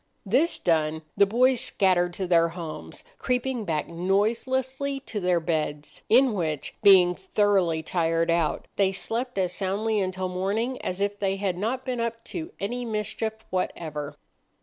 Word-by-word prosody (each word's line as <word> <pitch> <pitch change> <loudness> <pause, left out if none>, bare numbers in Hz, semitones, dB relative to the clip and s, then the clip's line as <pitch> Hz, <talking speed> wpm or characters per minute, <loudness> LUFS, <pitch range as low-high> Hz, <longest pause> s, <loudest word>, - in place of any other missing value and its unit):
This 260 - +2
done, 160 -2 +1
the 200 - +5
boys 250 +4 +3
scattered 180 -2 +2
to 190 - -2
their 170 -2 +4
homes, 165 -2 -8 0.2
creeping 250 -2 -1
back 155 -4 -1
noiselessly 255 +10 0
to 225 -5 -5
their 180 -2 +2
beds, 155 -3 -3
in 250 +1 +5
which, 155 -7 -2
being 185 -3 +7
thoroughly 190 -3 +1
tired 165 0 +1
out, 170 -2 0
they 195 -1 +3
slept 235 +5 -3
as 180 -2 0
soundly 205 +4 -1
until 185 -1 -2
morning 200 +8 -2
as 185 +2 -3
if 205 0 -1
they 195 -1 0
had 195 -2 -1
not 230 +8 -2
been 250 -2 -2
up 230 0 -3
to 325 +7 -6
any 245 +5 -3
mischief 220 0 -3
whatever. 155 -5 -3
195 Hz, 150 wpm, -26 LUFS, 175-230 Hz, 0.2 s, being